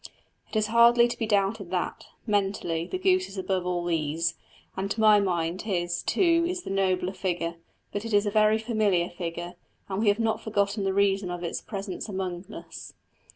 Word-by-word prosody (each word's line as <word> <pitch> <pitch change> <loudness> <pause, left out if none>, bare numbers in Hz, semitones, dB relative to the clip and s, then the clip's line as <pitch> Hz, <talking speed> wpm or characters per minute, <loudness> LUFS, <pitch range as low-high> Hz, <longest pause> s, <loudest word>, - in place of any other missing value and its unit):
It - - -10
is 215 -1 +3
hardly 235 +1 +7
to 240 - -4
be 225 - -2
doubted 200 -2 +1
that, 180 -1 -3 0.2
mentally, 195 -6 0
the - - -3
goose 370 0 +2
is 195 - -10
above 185 -1 -1
all 175 -1 -1
these; 165 0 0 0.4
and 195 +1 -2
to 215 - -3
my 215 -1 +6
mind 175 -2 -1
his, 175 -4 -1
too, 335 -2 +3
is 360 0 -3
the - - -5
nobler 190 -1 +1
figure; 170 -3 -2 0.3
but 205 - -3
it 230 - -5
is 205 0 +3
a 205 - 0
very 215 0 +4
familiar 215 -6 +1
figure, 175 0 -5 0.4
and 190 0 -2
we 225 - +1
have 205 0 +4
not 225 -1 0
forgotten 200 -1 0
the 190 - +1
reason 195 -1 +2
of 175 0 -5
its 170 - -3
presence 200 -1 -6
among 185 -2 -4
us. - - -9
195 Hz, 195 wpm, -27 LUFS, 175-215 Hz, 0.4 s, hardly